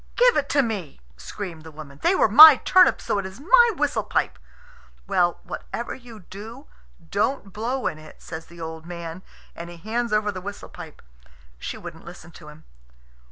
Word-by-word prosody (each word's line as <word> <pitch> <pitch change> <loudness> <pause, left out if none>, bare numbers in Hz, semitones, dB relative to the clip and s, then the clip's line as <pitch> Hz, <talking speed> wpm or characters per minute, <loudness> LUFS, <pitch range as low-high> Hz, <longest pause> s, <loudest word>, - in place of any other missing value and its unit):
"Give - - +4
it 285 -1 0
to 285 -1 +3
me!" 200 - -5 0.2
screamed 160 - -8
the - - -12
old 155 - -18
woman. 145 -2 -11
"They 380 - +3
were - - +4
my 300 +7 +11
turnips, 370 +7 +3
so 205 - -1
it 195 - -5
is 190 +5 -12
my 475 - +5
whistle - - 0
pipe." - - -2 0.7
"Well, 180 -3 +1
whatever 235 - -6
you 235 -4 -13
do, 220 - -11 0.5
don't 200 0 -1
blow 245 +5 -3
in 155 - -2
it," 155 0 -15
says 160 0 -9
the 170 0 -15
old 160 0 -8
man, 170 0 -7 0.3
and 170 0 -8
he 175 - -11
hands 230 +6 -3
over 210 0 +1
the 185 -2 -8
whistle 200 +2 -8
pipe. 165 -4 -12 0.6
She - - -6
wouldn't - - -10
listen 170 - -12
to 150 - -14
him. 150 +1 -14
200 Hz, 190 wpm, -23 LUFS, 165-240 Hz, 0.7 s, my